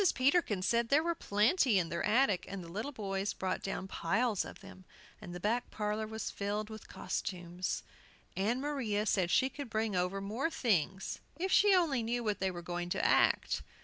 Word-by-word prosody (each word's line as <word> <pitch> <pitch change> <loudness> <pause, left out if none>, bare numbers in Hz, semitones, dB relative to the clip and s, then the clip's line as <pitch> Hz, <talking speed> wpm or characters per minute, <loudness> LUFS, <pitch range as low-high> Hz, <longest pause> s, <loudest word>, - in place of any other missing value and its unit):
Peterkin 255 - +2
said 235 +3 +2
there 295 +3 +4
were 340 0 +1
plenty 230 - +3
in 170 -3 +1
their 170 +1 -2
attic, 215 -3 +2
and 195 -2 -5
the - - -10
little 215 +10 -3
boys 200 -4 -2
brought 185 -1 -2
down 195 -1 -4
piles 205 +5 0
of - - -10
them, 190 -1 -12 0.4
and - - -8
the 175 - -6
back 230 +6 0
parlor 210 0 -2
was 220 0 -4
filled 210 +2 -3
with 220 -1 -9
costumes. 180 0 -3 0.5
Ann 220 +6 +1
Maria 255 -8 -1
said 185 -5 +2
she 260 - +4
could 275 -1 -7
bring 220 -2 -1
over 180 +2 0
more 220 +10 -1
things 190 - 0 0.2
if 375 +3 -1
she 405 0 +6
only 310 -9 +2
knew 235 +2 -1
what 210 -3 -1
they 190 - +1
were 175 -2 -6
going 175 +1 -3
to - - 0
act. - - +3
210 Hz, 190 wpm, -33 LUFS, 190-245 Hz, 0.5 s, she